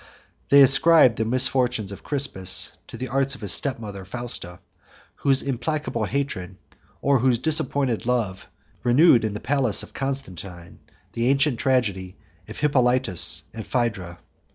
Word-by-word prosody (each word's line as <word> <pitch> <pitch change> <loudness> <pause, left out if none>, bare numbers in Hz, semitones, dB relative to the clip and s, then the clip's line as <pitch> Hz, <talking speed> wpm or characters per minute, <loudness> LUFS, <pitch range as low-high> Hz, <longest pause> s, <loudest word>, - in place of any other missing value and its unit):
They 140 0 +7
ascribe 135 -1 +6
the 110 - -1
misfortunes 125 -3 +1
of 100 - -9
Crispus 135 -11 0
to - - -10
the 130 +1 -6
arts 135 +2 0
of 130 - -15
his 105 - -1
step 140 -2 -2
mother 100 -4 -8
Fausta, 95 -4 -5 0.6
whose 135 -1 +2
implacable 135 -2 -3
hatred, 95 -8 -4 0.5
or 140 -1 +3
whose 125 0 +2
disappointed 140 -4 -1
love, 110 -7 -2 0.4
renewed 125 0 +4
in 110 -2 -2
the - - -5
palace 130 -5 0
of - - -14
Constantine 95 - -6 0.3
the 115 +1 -2
ancient 135 -3 +1
tragedy 105 -9 -1 0.3
of - - -10
Hippolitus 130 - +2
and 115 - -7
of - - -21
Phædra. 100 -8 -2
125 Hz, 145 wpm, -23 LUFS, 105-135 Hz, 0.6 s, They